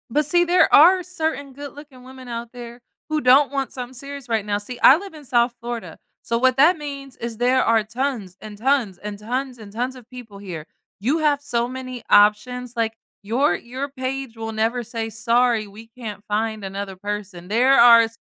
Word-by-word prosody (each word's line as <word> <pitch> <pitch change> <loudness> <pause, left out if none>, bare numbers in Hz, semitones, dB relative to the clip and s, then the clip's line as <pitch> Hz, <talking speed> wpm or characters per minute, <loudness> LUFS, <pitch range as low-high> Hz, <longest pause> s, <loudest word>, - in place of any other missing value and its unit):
But 300 0 +2
see, 345 +4 +3
there 350 0 +3
are 360 +5 +7
certain 320 -6 -3
good 285 +1 -9
looking 280 -3 -14
women 260 0 -12
out 235 0 -5
there, 240 0 -10 0.3
who 310 0 0
don't 270 +3 +5
want 275 -2 -3
something 250 -1 -7
serious 275 0 -9
right 220 -3 0
now, 205 -1 0
see, 240 +4 -8
I 265 - +9
live 390 +1 -9
in 300 -2 -12
South 240 -1 +2
Florida, 235 -1 -6 0.2
so 230 - -1
what 255 +1 +3
that 320 +6 +5
means 280 -3 -8
is 230 -1 -6
there 250 +2 +3
are 225 -1 +3
tons, 215 -4 -4
and 210 -1 -9
tons, 235 -5 +1
and 205 +2 -7
tons, 250 +4 -3
and 215 -3 -12
tons 250 +4 -3
of 250 -2 -15
people 245 -5 -11
here. 180 -6 -7 0.3
You 260 +10 +1
have 295 -2 +2
so 240 -4 -1
many 255 -1 -7
options, 230 +4 +3
like, 225 -1 0 0.3
your 225 -1 +1
your 255 +7 -6
page 260 -2 -5
will 225 0 -5
never 225 +3 0
say, 225 0 -5
"Sorry, 230 0 +1
we 215 +3 -13
can't 225 -4 -9
find 215 0 -2
another 195 0 -5
person," 200 -2 -6
there 255 +5 +4
are 235 -1 +8
245 Hz, 200 wpm, -22 LUFS, 220-270 Hz, 0.3 s, I